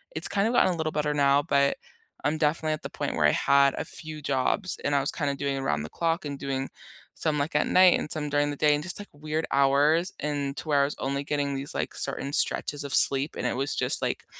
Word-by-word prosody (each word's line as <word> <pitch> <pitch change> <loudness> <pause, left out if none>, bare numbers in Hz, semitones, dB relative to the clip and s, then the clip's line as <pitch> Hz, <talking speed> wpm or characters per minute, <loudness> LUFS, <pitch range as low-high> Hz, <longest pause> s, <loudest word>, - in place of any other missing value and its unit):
it's - - -3
kinda 205 +3 0
gotten 190 -7 +3
a - - -5
little 160 -1 -2
better 150 -1 -1
now, 140 0 +3
but 140 -1 +1 0.5
I'm 150 +2 +1
definitely 155 +1 0
at 155 - -6
the - - -5
point - - -4
where 75 - +2
I 75 - +5
had 140 0 +3
a - - -3
few 155 -1 -8
jobs 145 +8 0
and 145 0 0
I 140 - +3
was 135 - 0
kinda 145 -3 -2
doing 140 0 -2
around 75 - -1
the 75 - -7
clock 165 +1 -1
and 140 -1 -5
doing 135 -1 -3 0.5
some, 155 -2 -1
like, 145 +2 -2
at 150 - +2
night 185 -1 +5
and - - -5
some 150 -1 -2
during 145 0 +1
the 145 - -4
day 150 +1 +3
and 145 - -3
just 180 +1 0
like 205 - -9
weird 155 +2 -3
hours 145 +6 +3
and 145 -2 -2
to - - -7
where 140 -1 +3
I - - +3
was 145 - -4
only 140 +1 -2
getting 145 -1 -1
these, 135 +1 -5
like, - - -3
certain 140 - -2
stretches 145 0 0
of 140 - -2
sleep, 140 +2 +4
and - - -4
it - - -2
was 135 +2 0
just, - - +3
like, - - -3
145 Hz, 255 wpm, -26 LUFS, 140-155 Hz, 0.5 s, I